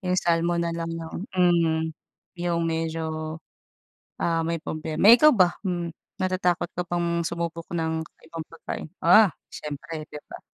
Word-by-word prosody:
yung 180 -1 0
salmon 170 -1 +2
nalang 165 0 -2
yung 165 -1 -6 0.2
hmm, 165 -3 +3 0.5
yung 175 -1 0
medyo, 160 -1 -2 0.8
ah, 165 -1 +1
may 165 +1 -1
problema." 155 +3 -1
Eh, 230 - +12
ikaw 305 +5 +7
ba, 185 -9 +4
hmm, 175 -4 -2 0.2
natatakot 185 -2 +1
ka 180 - -1
bang 170 -1 0
sumubok 170 0 -4
ng 160 -1 -1 0.2
ibang 165 0 -6
pagkain? 165 -1 -6
Ah, 215 -3 +7 0.2
siyempre, 150 +2 -6
'di 150 - -7
ba? - - -10
170 Hz, 140 wpm, -25 LUFS, 160-175 Hz, 0.8 s, Eh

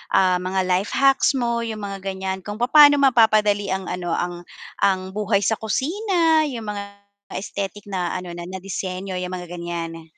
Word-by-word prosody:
ah, 185 -1 +4
mga 185 +1 -1
life 185 +3 0
hacks 270 +1 +4
mo 235 -1 0
yung 220 -2 -5
mga 195 -1 -5
gan'yan, 190 0 -3
kung 205 0 -6
papano 290 +4 +7
mapapadali 215 -6 +4
ang 190 0 -2
ano 180 -1 -4
ang 175 0 -3 0.4
ang 190 -1 +1
buhay 210 -1 +1
sa 220 - +2
kusina, 325 - +1
yung 230 -4 -6
mga 205 -1 -4 0.6
aesthetic 200 +1 -5
na 185 -3 -2
ano 180 -1 -5
na 175 0 -7
na 190 +1 -6
disenyo 185 0 -4
yung 180 0 -4
mga 180 -1 -6
gan'yan. 165 -2 -6
195 Hz, 170 wpm, -22 LUFS, 185-225 Hz, 0.6 s, papano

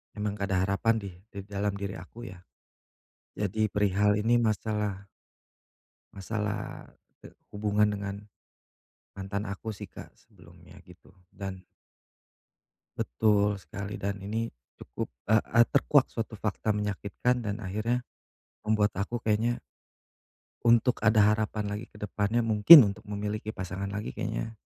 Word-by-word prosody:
emang 105 -1 -2
gak 100 - -1
ada 95 -1 +2
harapan 100 +4 +2
deh 95 -3 -7
di 100 -3 -9
dalam 100 0 -2
diri 100 -3 -5
aku 110 +6 -10
ya. 90 - -12 1.0
Jadi 105 +2 0
perihal 105 0 +2
ini 120 +1 +4
masalah 105 -3 -1 1.1
masalah, 105 +1 -4 0.3
eee, - - -12 0.2
hubungan 105 0 +1
dengan 100 -1 -4 1.0
mantan 100 +2 -4
aku 110 +3 -5
sih - - -8
Kak - - -11
sebelumnya - - -18
gitu - - -18 0.2
dan 95 -1 -7 1.4
Betul 105 - +2
sekali 100 +5 -7
dan 100 0 -3
ini 110 +3 -2 0.3
cukup, - - -6 0.2
eee 110 0 +4
eee, 115 +1 +6
terkuak 140 0 +3
suatu 110 -2 -5
fakta 110 0 -1
menyakitkan 105 +4 -1
dan 105 +1 -3
akhirnya 110 +5 -1 0.7
membuat 105 -2 +1
aku 110 +5 -2
kayaknya 110 +3 0 1.0
untuk 120 +1 +4
ada 105 -1 +5
harapan 105 0 -2
lagi 105 +3 -4
ke - - -17
depannya 105 +2 -1
mungkin 115 +5 +10
untuk - - -16
memiliki 105 +1 -3
pasangan 95 +1 -5
lagi 105 +2 -4
kayaknya 115 0 -3
105 Hz, 130 wpm, -28 LUFS, 100-110 Hz, 1.4 s, mungkin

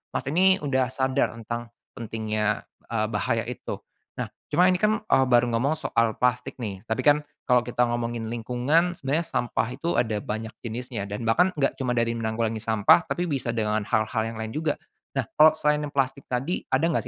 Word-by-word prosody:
Mas, - - 0
ini 190 +3 +5
udah 130 -3 +1
sadar 130 -1 0
tentang 120 +1 -5 0.2
pentingnya, 110 -2 -2 0.2
eee, 110 -2 0
bahaya 105 -4 0
itu. - - -6 0.3
Nah, - - -4 0.2
cuma 180 +5 +4
ini 180 - +3
kan, 215 +2 +2
eee, 135 -11 +3
baru 120 -1 +4
ngomong 125 +6 +1 0.2
soal 115 -1 +2
plastik 125 0 +1
nih, 100 -1 -5
tapi 110 - -1
kan 150 0 +4 0.2
kalau 125 -1 +4
kita 120 0 -1
ngomongin 120 -1 -2
lingkungan, 125 +10 +1
sebenarnya 155 +2 -1
sampah 115 -4 -1
itu 170 +1 -2
ada 110 -3 +1
banyak 110 +1 -4
jenisnya 115 -3 -5
dan 105 +3 -4
bahkan 175 +12 +4
enggak 140 - +2
cuma 125 -2 -1
dari 115 0 +2
menanggulangi 110 -1 -2
sampah 110 - +4
tapi 175 - -1
bisa 135 -7 -2
dengan 110 -2 0
hal-hal 110 +1 +1
yang 115 - -8
lain 110 0 -5
juga. 155 -1 -1 0.4
Nah, 130 - +1
kalau 155 +1 +8
selain 150 -1 +2
plastik 135 -1 -1
tadi, 130 +8 -1
ada 135 +5 +2
enggak 170 - 0
120 Hz, 185 wpm, -26 LUFS, 110-145 Hz, 0.4 s, kalau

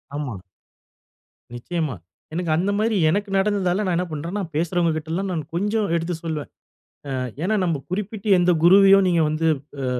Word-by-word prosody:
ஆமா. 130 -10 -4 1.1
நிச்சயமா. 155 +3 -3 0.4
எனக்கு 170 -1 -2
அந்த 190 +4 0
மாரி 220 0 +1
எனக்கு 200 +5 -1
நடந்ததால 195 -1 +1
நான் 180 -2 0
என்ன 180 - 0
பண்றேன்னா, 170 +7 -4
பேசுறவுங்ககிட்டலாம் 170 +2 -1
நான் 165 -4 -2
கொஞ்சம் 205 +3 0
எடுத்து 170 +1 -1
சொல்வேன். 155 -3 -4 0.7
அ - - -2 0.2
ஏன்னா, 200 +5 +1
நம்ம 165 -5 -1
குறிப்பிட்டு, 205 +2 -4
எந்த 175 0 +3
குருவயோ 195 +2 +7
நீங்க 170 -2 +3
வந்து 155 +1 -1 0.4
அ - - -1
175 Hz, 145 wpm, -22 LUFS, 160-195 Hz, 1.1 s, குருவயோ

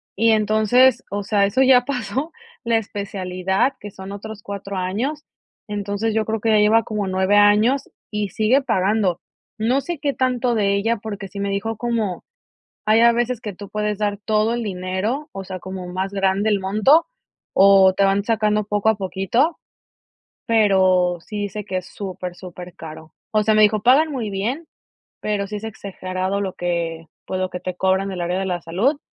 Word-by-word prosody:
y 225 +2 +3
entonces, 220 +4 +4
o 205 0 -3
sea, 200 0 +2
eso 200 +7 +1
ya 255 -2 +5
pasó 265 +4 -3 0.3
la 230 -1 +2
especialidad, 195 +2 -1
que 205 - -8
son 190 0 -9
otros 210 +1 -8
4 200 -2 -6
años. 230 +12 -2 0.4
Entonces, 205 +1 -2
yo 220 0 +1
creo 220 0 -2
que 225 +2 -1
ya 215 - +5
lleva 220 +2 +4
como 210 -3 -3
9 190 +2 +1
años 210 +6 +4 0.2
y 210 -1 -2
sigue 220 +8 +2
pagando. 190 -6 +1 0.4
No 245 +5 +1
sé, 345 +2 -4
qué 285 -1 -1
tanto 250 -2 0
de 200 -2 +2
ella 225 +4 0
porque 205 -2 -6
sí 200 +1 -9
me 200 0 -1
dijo, 210 +3 -2
como: 225 -5 -2 0.6
"Hay 215 +1 +4
a 235 0 +6
veces 240 0 -1
que 210 -3 -5
tú 200 +1 -10
puedes 210 -1 -2
dar 205 -1 -1
todo 215 +1 +1
el 240 - -2
dinero", 195 +8 -3
o 195 0 -6
sea, 185 0 -6
como 185 0 -7
más 190 +2 -3
grande 195 +2 +1
el 205 -2 +1
monto, 215 - +4 0.5
o 195 -1 +6
te 200 - +2
van 195 +1 +2
sacando 215 -1 +1
poco 205 +1 0
a 220 - +3
poquito, 205 - 0 0.9
pero, 185 -5 +3
sí 210 +5 -7
dice 205 +1 -4
que 190 -2 -2
es 185 - -8
súper, 185 -3 -6
supercaro. 165 -3 -10 0.2
O 215 -1 +2
sea, 215 +1 +2
me 215 - +5
dijo: 210 -1 +3
"Pagan 275 +7 +5
muy 230 -6 -3
bien, 235 +12 -3 0.5
pero 205 -1 -1
sí 210 +1 -5
es 210 - -7
exagerado 190 -2 -4
lo 190 -2 -3
que, 170 -2 -3 0.2
pues, 185 - -3
lo 185 - 0
que 180 - -6
te 180 0 -4
cobran 190 +1 +1
del 185 -2 -5
área 175 +1 -1
de 195 - -2
la 180 -2 -2
salud", 200 - 0
205 Hz, 185 wpm, -21 LUFS, 190-225 Hz, 0.9 s, a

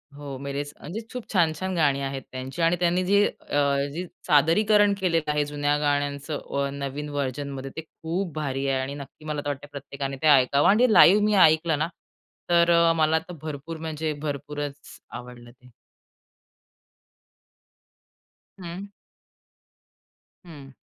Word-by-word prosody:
हो. 145 -2 -7
मेरेच 140 +1 -5
म्हणजे 195 +9 -6
खूप 250 -2 -5
छान-छान 180 +1 +1
गाणी 145 -4 +2
आहेत 135 0 -3
त्यांची 130 +5 -6
आणि 165 +1 +3
त्यांनी 180 +1 +2
जे 200 +2 +4 0.3
अ, - - -2 0.4
जे 175 +4 -4 0.2
सादरीकरण 205 +8 +4
केलेलं 165 -5 +1
आहे 150 0 +1
जुन्या 145 0 0
गाण्यांचं 145 -1 -2
नवीन 140 +2 -4
व्हर्जनमध्ये 140 -1 -4
ते - - -2
खूप 165 +2 -5
भारी 140 -2 -2
आहे. 135 -1 +1
आणि 135 +1 -4
नक्की 145 +2 -11
मला 150 -1 -3
तर - - -3
वाटतं 145 0 -5
प्रत्येकाने 140 0 -5
ते 155 - +2
ऐकावं 140 0 +5
आणि 215 +5 +4
ते - - 0
लाईव्ह 205 +2 +7
मी 210 - +2
ऐकलं 160 0 +2
ना, 155 - +1 0.6
तर 170 -1 +5
मला 160 0 +3
तर 180 +2 -11
भरपूर 155 +1 -6
म्हणजे 155 -1 -3
भरपूरच 145 -1 -6
आवडलं 120 -1 -10
ते. 125 +1 -21 2.9
हं. 185 +3 -8 1.5
हं. 145 -5 -12
150 Hz, 140 wpm, -25 LUFS, 140-170 Hz, 2.9 s, लाईव्ह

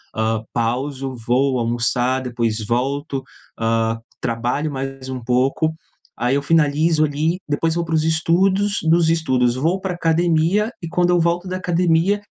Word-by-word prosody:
ah, 110 0 0
pauso, 130 +3 -2
vou 130 +1 +2
almoçar, 120 +2 0
depois 115 -3 -2
volto, 135 +4 -1 0.4
hã, 115 0 +1 0.2
trabalho 120 +6 -1
mais 135 -1 -5
um 130 -1 -4
pouco. 130 +6 +1 0.5
Aí, 125 +2 0
eu 140 - +1
finalizo, 155 +1 +2
ali. 155 +5 -1
Depois 160 +2 0
vou 170 0 -1
para 165 - -4
os 155 - +2
estudos. 190 +5 +2
Dos 165 -1 +4
estudos, 130 -7 +2
vou 165 +8 0
para 190 -1 -3
a - - -6
academia 170 +5 +2
e 170 - -5
quando 180 +1 +2
eu 175 - +3
volto 170 +2 0
da 185 0 -3
academia, 175 +2 +2
145 Hz, 155 wpm, -20 LUFS, 125-170 Hz, 0.5 s, Dos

